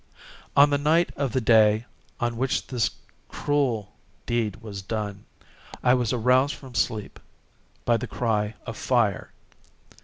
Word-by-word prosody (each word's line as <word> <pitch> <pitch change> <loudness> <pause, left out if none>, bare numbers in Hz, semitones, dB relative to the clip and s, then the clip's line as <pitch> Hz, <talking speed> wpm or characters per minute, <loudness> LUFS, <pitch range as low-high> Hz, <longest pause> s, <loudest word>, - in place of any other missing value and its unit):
On 145 +1 +7
the 145 - +2
night 160 +4 +3
of 140 -3 -1
the 130 - +1
day 110 -1 +4 0.3
on 120 0 -1
which 130 +3 -1
this 120 -6 0 0.4
cruel 130 -8 -1 0.3
deed 115 -3 -1
was 105 -3 -8
done, 105 0 -4 0.6
I 125 - +5
was 125 -4 +1
aroused 130 +4 +3
from 130 -3 -12
sleep 110 -3 -2 0.7
by 120 -1 +3
the - - -5
cry 110 -2 -1
of - - -6
fire. - - 0
120 Hz, 135 wpm, -25 LUFS, 110-130 Hz, 0.7 s, On